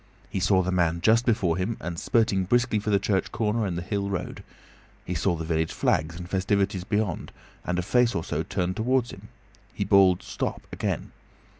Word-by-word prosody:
He - - -1
saw 95 0 +3
the 90 - -1
man 85 -2 +1
just 115 +5 +3
before 95 -8 +2
him 95 +5 -2
and 85 0 -5
spurting 110 -6 +2
briskly 120 +1 +2
for 105 - -3
the 100 - +4
church 100 -1 0
corner 110 -1 0
and 85 -2 -3
the 85 - -3
hill 100 +1 -2
road. 95 -3 -4 0.6
He 90 - -3
saw 85 +2 +1
the 80 0 -5
village 80 0 0
flags 80 +2 0
and 90 0 -7
festivities 95 0 0
beyond, 105 -3 -2 0.3
and 90 - -2
a 90 - 0
face 125 +4 +2
or 85 - -1
so - - -2
turned 90 +1 -2
towards 125 +1 +1
him. 100 +2 -11 0.5
He 100 - -1
bawled, 95 -2 +5
"Stop!" - - -4
again. - - -3
95 Hz, 195 wpm, -26 LUFS, 90-110 Hz, 0.6 s, bawled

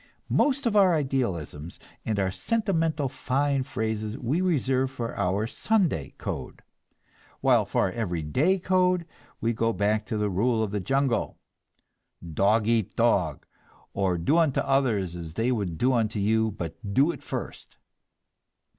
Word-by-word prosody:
Most 280 -1 +2
of 225 -3 +1
our 190 -4 +5
idealisms 95 - -2 0.3
and 110 -2 -1
our 95 -1 +1
sentimental 165 - 0
fine 135 +2 0
phrases 110 -2 -3
we 140 +7 -1
reserve 135 -7 +1
for 120 -3 -5
our 100 +2 0
Sunday 155 - 0
code, - - -6 0.8
while - - +4
for - - +1
our - - 0
every 90 -9 -3
day 150 - +2
code 180 -1 +2 0.4
we 115 +1 +1
go 115 0 +1
back 105 +1 0
to 110 - -2
the 105 0 0
rule 110 +4 +1
of 105 - -3
the 105 - -1
jungle: 135 +3 0 1.0
"Dog 105 +6 +3
eat 115 -4 +1
dog," - - +1 0.5
or 95 -3 0
"Do 145 - +2
unto 155 -5 +2
others 120 -10 +1
as 85 -2 -8
they 115 +3 +1
would 100 -9 -2
do 130 +7 +2
unto 110 -2 0
you, 110 +2 +2
but 85 -6 -5 0.2
do 140 +5 +4
it - - -10
first." - - -7
115 Hz, 150 wpm, -26 LUFS, 100-140 Hz, 1.0 s, our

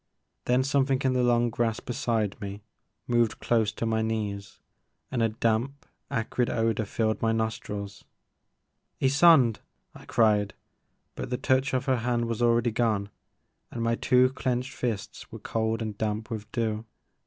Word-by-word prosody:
Then 125 +1 +3
something 135 -1 +2
in 130 -1 +2
the 125 - +2
long 120 -1 +3
grass 115 -1 0
beside 115 -4 -2
me 100 0 -6 0.4
moved 120 -2 +1
close 110 -3 +1
to 115 - -3
my 110 -1 +1
knees 105 -3 -3 0.5
and 125 - -1
a 115 - +3
damp 115 +5 -1 0.2
acrid 115 +2 -1
odor 115 -1 0
filled 110 +1 -1
my 115 - +2
nostrils. 105 -3 -3 0.5
" - - -51
Ysonde! 135 -4 +5 0.2
*' - - -48
I - - -13
cried, 105 -3 +2 0.6
but - - -6
the 125 - -1
touch 130 +1 +1
of 130 - -1
her 130 -2 +2
hand 120 0 0
was 115 0 -3
already 120 0 +3
gone 105 -3 0 0.6
and 115 - -4
my 115 0 +2
two 125 +1 +4
clenched 130 0 -2
fists 115 -7 -4
were - - -7
cold 110 0 -1
and 110 -2 -4
damp 110 +1 -2
with 110 -1 -6
dew. 110 -2 -1
115 Hz, 160 wpm, -27 LUFS, 110-125 Hz, 0.6 s, Ysonde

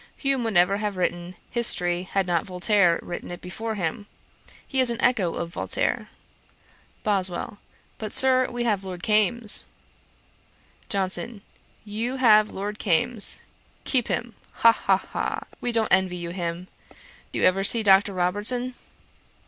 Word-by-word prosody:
Hume 275 -3 0
would 220 -3 -2
never 180 +3 +4
have 205 -2 -3
written 175 0 -2 0.2
History, 180 -6 -1
had 195 -1 +1
not 175 0 -1
Voltaire 180 -1 +2
written 175 - -7
it 175 0 -7
before 220 +5 -5
him. 195 +2 -3 0.6
He 265 - -2
is 255 -2 +6
an 235 - -2
echo 215 -9 +1
of 170 - -4
Voltaire.' - - -1 0.9
BOSWELL. 195 -1 -1 0.4
'But, 215 -2 -5
Sir, 255 -1 +3
we 245 -1 -3
have 210 -5 0
Lord 180 -2 -7
Kames.' 215 +1 +2 1.2
JOHNSON. 200 +2 -1 0.4
'You 225 +5 -3
have 215 -5 +5
Lord 205 +2 -5
Kames. 205 +4 0 0.4
Keep 250 -4 +1
him; 235 -1 -3 0.2
ha, 230 - +6
ha, - - +1
ha! - - -4 0.2
We 245 - 0
don't 225 -2 +2
envy 190 -2 +2
you 170 -1 -5
him. 175 0 -4 0.6
Do - - -4
you - - +2
ever 195 +1 +3
see 225 +3 +5
Dr. 195 -1 +4
Robertson?' 210 +8 0
205 Hz, 145 wpm, -25 LUFS, 180-230 Hz, 1.2 s, is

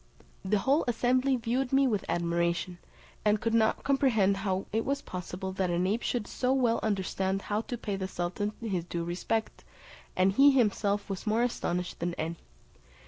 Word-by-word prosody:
The 205 +2 +1
whole 275 +10 +2
assembly 255 +3 +2
viewed 245 +2 -1
me 270 0 +4
with 215 -6 0
admiration, 170 +1 0 0.4
and 210 0 +3
could 230 +2 -1
not 220 -1 +2
comprehend 235 -8 +3
how 190 -1 -1
it 225 +1 +1
was 280 +1 -2
possible 185 +1 -5
that 190 -1 -1
an 175 +1 +1
ape 215 +5 0
should 240 -4 -1
so 250 +4 -1
well 245 -4 +2
understand 195 -1 -1
how 210 +1 -1
to 245 +1 -5
pay 205 -3 -3
the 190 -1 -3
sultan 185 +4 -3
his 190 -6 -1
due 170 0 -4
respect; 180 +6 -2 0.5
and 185 +1 +4
he 275 +8 +6
himself 210 -5 +1
was 195 +1 -5
more 220 +3 +2
astonished 180 -7 -2
than 170 0 -2
any. 165 +1 -3
205 Hz, 175 wpm, -29 LUFS, 185-240 Hz, 0.5 s, he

